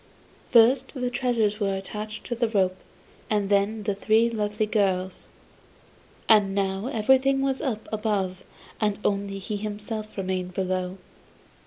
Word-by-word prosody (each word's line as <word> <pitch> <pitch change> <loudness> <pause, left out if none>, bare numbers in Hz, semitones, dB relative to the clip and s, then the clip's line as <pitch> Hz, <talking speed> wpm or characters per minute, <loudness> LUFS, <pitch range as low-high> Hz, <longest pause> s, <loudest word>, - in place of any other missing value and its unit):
First 250 +4 +4
the 250 -1 -2
treasures 235 -4 +1
were 195 -2 0
attached 210 +3 -6
to - - -4
the 235 0 +1
rope 190 -4 +1 0.5
and 205 -2 0
then 205 +2 +2
the 205 0 0
three 220 +3 +2
lovely 210 -1 -1
girls. 190 -3 -1 1.0
And 205 -3 +5
now 195 +2 -1
everything 265 +3 +3
was 270 -1 0
up 220 -5 -3
above 200 -4 -1 0.4
and 210 -2 +1
only 200 -1 0
he 205 +2 -4
himself 215 +1 -5
remained 185 -1 -3
below. 185 0 -2
210 Hz, 135 wpm, -26 LUFS, 195-225 Hz, 1.0 s, And